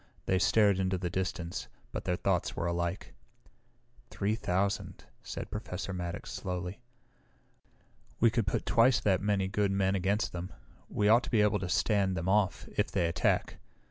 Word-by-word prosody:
They 95 - +2
stared 95 +3 +4
into 95 0 +1
the 90 -1 -3
distance, 90 -2 -3 0.2
but - - -5
their 90 - +1
thoughts - - 0
were - - -2
alike. 85 +1 -2 1.0
"Three 100 +2 -1
thousand," 100 -2 -1 0.2
said - - -6
Professor 95 -2 -4
Maddox 85 -1 -5
slowly. 90 +3 -4 1.4
"We 115 -1 +5
could 115 -4 0
put - - -1
twice 115 0 +4
that 100 -3 +2
many 100 -2 +1
good 100 0 0
men 95 0 +2
against 100 +1 0
them. 90 +1 -5 0.4
We 105 - +1
ought 115 +3 +6
to - - -6
be 110 -4 +3
able 105 0 +2
to 95 -1 -4
stand 95 -2 +2
them 85 +2 -3
off, 95 -2 +1
if - - +1
they 85 - 0
attack. 85 - 0
95 Hz, 165 wpm, -31 LUFS, 90-105 Hz, 1.4 s, ought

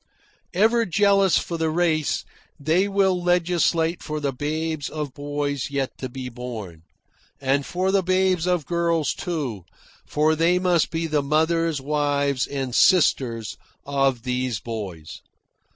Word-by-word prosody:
Ever 225 +3 +3
jealous 195 0 +4
for 170 -1 -3
the 160 -1 +1
race, 155 -2 0 0.3
they 160 +7 +2
will 195 -2 +2
legislate 175 -1 +1
for 155 -1 -4
the 140 -2 -2
babes 155 +2 -3
of 150 -4 -5
boys 145 -1 -3
yet 140 -2 -2
to 130 - -4
be 130 +1 -6
born; 115 -9 -7 0.6
and 140 +1 0
for 185 +2 0
the 195 0 +3
babes 185 -1 +1
of 180 -5 +1
girls, 170 -2 0
too, 140 - -4 0.4
for 155 +1 +2
they 165 +3 +3
must 180 -3 +2
be 165 0 -2
the 155 -2 +1
mothers, 160 +2 +1
wives, 145 -1 0
and 135 -3 -4
sisters 125 - +3 0.3
of 135 -4 +1
these 125 -2 -1
boys. 95 -9 -7
155 Hz, 135 wpm, -23 LUFS, 135-175 Hz, 0.6 s, jealous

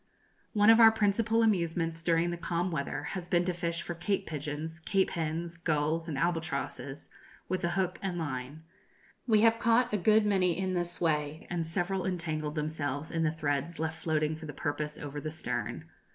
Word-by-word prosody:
One 210 0 +6
of 225 - +6
our 225 -1 +9
principal 220 +2 +2
amusements 165 -5 +1
during 170 0 +2
the - - -2
calm 175 +1 -1
weather 145 -2 -2
has 180 -2 -5
been 175 -1 +3
to 180 - 0
fish 170 0 -2
for 175 - -4
cape 185 +4 -1
pigeons, 155 +2 -4
cape 190 +3 +1
hens, 165 +1 -3
gulls, 160 0 0
and 145 - -3
albatrosses, 155 -4 -2 0.4
with 185 +1 -2
a 175 - +2
hook 185 -1 0
and 185 -3 -2
line. 145 -1 -4 0.6
We 215 -3 +5
have 225 0 +5
caught 235 +1 +3
a - - +3
good 215 +3 +4
many 185 -4 +2
in 190 0 -1
this 175 -1 -2
way, 155 +1 0
and 170 -2 -1
several 180 +3 -1
entangled 155 -4 -2
themselves 150 -1 -2
in 165 - -1
the 155 -1 +2
threads 150 +1 -2
left 160 0 -3
floating 155 -1 0
for 160 0 -9
the 145 - -6
purpose 150 +2 -3
over 145 0 -6
the 155 - -3
stern. 155 0 -4
165 Hz, 185 wpm, -30 LUFS, 155-185 Hz, 0.6 s, our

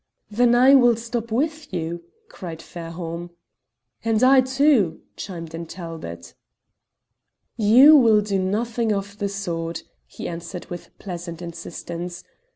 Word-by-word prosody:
"Then 240 +2 +3
I 255 +3 +6
will 245 -3 +6
stop 230 0 -5
with 305 +5 -1
you," 170 -1 -4 0.2
cried 170 - -8
Fairholme. 170 0 -7 0.7
"And 225 0 +1
I 260 0 +7
too," 260 - +2
chimed 165 -4 -7
in 165 0 -6
Talbot. 160 - -8 1.2
"You 245 +8 +7
will 225 -6 +6
do 200 -2 -1
nothing 220 +4 -1
of 200 0 -3
the 200 - -1
sort," 170 -4 -4 0.2
he - - -7
answered 170 +1 -7
with 175 - -7
pleasant 175 -3 -7
insistence. 170 0 -7
195 Hz, 125 wpm, -23 LUFS, 170-235 Hz, 1.2 s, I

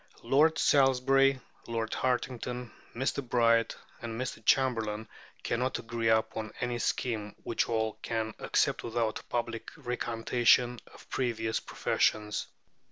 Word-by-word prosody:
Lord 150 +6 +4
Salisbury, 135 0 +4 0.3
Lord 115 -1 -2
Hartington, 125 -1 -2 0.2
Mr. 135 +3 -1
Bright, 115 -2 +2 0.3
and 115 -1 -5
Mr. 125 -3 -4
Chamberlain 110 -4 +1 0.4
cannot 125 +2 0
agree 115 0 -2
upon 110 0 +1
any 120 -1 -1
scheme 110 -4 -2
which 115 - 0
all 110 -1 -1
can 110 -1 -2
accept - - +1
without 115 -2 -1
a - - -15
public 120 -1 -3
recantation 120 0 +2
of - - -15
previous 115 -3 -1
professions. 105 -1 0
120 Hz, 115 wpm, -30 LUFS, 110-125 Hz, 0.4 s, Lord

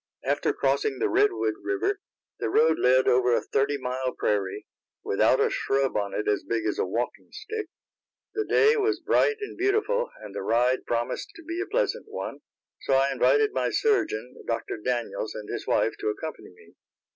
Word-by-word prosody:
After - - +1
crossing 435 -1 0
the 425 - 0
Redwood 400 +1 +2
river, 390 +1 -1 0.4
the - - -1
road 460 +3 +3
led 130 +1 +4
over 125 -1 +4
a - - +1
thirty 140 +1 0
mile 130 0 -3
prairie, 100 -3 -1 0.4
without - - +3
a - - +2
shrub 135 -1 0
on 100 -1 -1
it 105 - -2
as 105 - +1
big 115 -2 -2
as 105 - -1
a - - +1
walking 115 +6 -3
stick. 430 0 -5 0.7
The 435 - 0
day 440 +1 +4
was 425 0 +1
bright 440 - +2
and 415 - -5
beautiful, 440 +6 +1
and - - -9
the - - -4
ride 125 +2 +1
promised 120 0 -2
to 330 - -12
be 335 +3 -4
a 395 - -3
pleasant - - -1
one, 435 - -5 0.4
so 135 - +1
I 135 +1 +3
invited 425 - +3
my - - 0
surgeon, 125 - 0
Dr. 115 -1 -2
Daniels, 120 -1 -3
and 105 -1 -7
his - - -5
wife - - +2
to - - -3
accompany 155 +9 -6
me. 90 - -19
140 Hz, 180 wpm, -26 LUFS, -, 0.7 s, led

